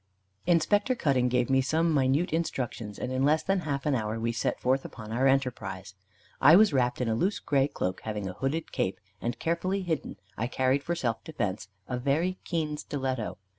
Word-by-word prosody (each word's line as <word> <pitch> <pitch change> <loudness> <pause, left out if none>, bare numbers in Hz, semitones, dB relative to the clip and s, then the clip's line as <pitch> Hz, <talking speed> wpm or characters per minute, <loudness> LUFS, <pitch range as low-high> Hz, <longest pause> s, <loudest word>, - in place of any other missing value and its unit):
Inspector 205 +8 +3
Cutting 135 - +2
gave 125 -1 +2
me 135 0 +3
some 160 +4 +1
minute 140 +4 +2
instructions, 125 -10 -2
and 125 - -4
in 130 +1 0
less 155 +3 +3
than 195 0 +1
half 145 -5 -3
an 150 - +2
hour 110 -2 -1
we 115 +1 0
set 115 - -1
forth 130 +2 +1
upon 110 -3 -9
our 130 +4 +2
enterprise. 105 -8 -1 0.5
I 155 - +9
was 210 -3 +6
wrapped 125 -2 +1
in 125 - 0
a 110 - +1
loose 185 - +1
grey 140 -1 +1
cloak 90 -9 -3
having 105 -3 -4
a 95 - -5
hooded 135 - -2
cape; - - -1 0.2
and 115 0 -2
carefully 185 +6 -1
hidden 165 -4 -2 0.2
I 110 +4 -1
carried 130 +2 +1
for 170 +4 -2
self 120 -9 -2
defence 105 - -3 0.2
a 125 -1 -2
very 160 +8 0
keen 155 -3 -1
stiletto. 130 -6 -3
135 Hz, 195 wpm, -28 LUFS, 120-160 Hz, 0.5 s, I